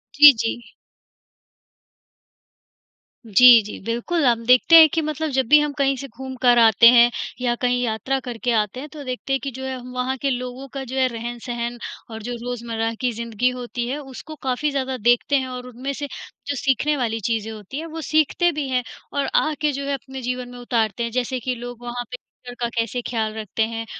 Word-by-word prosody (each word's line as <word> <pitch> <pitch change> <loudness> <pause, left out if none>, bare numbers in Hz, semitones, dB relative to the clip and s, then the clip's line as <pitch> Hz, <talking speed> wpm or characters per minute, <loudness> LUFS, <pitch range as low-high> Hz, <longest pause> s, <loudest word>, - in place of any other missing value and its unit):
जी, 295 -1 +10
जी। 230 +1 -4 2.5
जी, 230 +2 +8
जी, 210 - -8
बिल्कुल, 240 +8 -1
हम 235 -2 +2
देखते 250 +6 +6
हैं 320 -1 +10
कि 325 - +1
मतलब 310 0 -3
जब 260 -3 0
भी 300 - +8
हम 295 -1 0
कहीं 275 -1 +2
से 275 - -7
घूम 260 +1 -8
कर 245 -2 +5
आते 225 0 +7
हैं 240 0 +6 0.3
या 240 -1 +1
कहीं 245 0 +1
यात्रा 240 +4 -1
करके 245 -1 -3
आते 215 +1 0
हैं, 295 +3 -8
तो 300 -1 -9
देखते 255 +1 -4
हैं 270 - +1
कि 275 - -3
जो 260 +2 -8
है 265 0 -3
हम 250 0 -10
वहाँ 250 +1 -1
के 275 +2 -1
लोगों 250 +1 -4
का 270 -1 -4
जो 260 +1 -7
है 260 -1 +3
रहन-सहन 240 0 -5 0.3
और 220 0 -7
जो 245 +1 -4
रोज़मर्रा 230 -2 -3
की 250 -1 +1
जिंदगी 235 +2 -1
होती 245 -1 -5
है, 275 +4 -2
उसको 285 +3 -10
काफ़ी 270 +2 -2
ज़्यादा 265 -2 -2
देखते 240 +5 +2
हैं, 260 -1 0
और 250 0 -7
उनमें 250 +3 -5
से 285 +1 -5 0.4
जो 285 - -1
सीखने 275 +3 +1
वाली 225 -3 -1
चीज़ें 225 -1 -2
होती 215 +5 -8
हैं, 325 - -6
वो 325 0 -7
सीखते 315 +3 +3
भी 295 -3 -3
हैं 250 -1 0 0.3
और 285 -1 0
आके 305 -1 +1
जो 280 0 -4
है 280 - -1
अपने 265 -1 -7
जीवन 250 0 -4
में 245 0 -10
उतारते 230 -2 -1
हैं। 235 - -3
जैसे 255 +1 -2
कि 250 +1 -3
लोग 245 0 -8
वहाँ 240 0 -4
पे 250 - -5 0.3
घर 245 - -6
का 240 - 0
कैसे 230 +1 -1
ख्याल 220 -2 -2
रखते 220 0 -2
हैं, 225 0 -5
250 Hz, 210 wpm, -22 LUFS, 235-270 Hz, 2.5 s, जी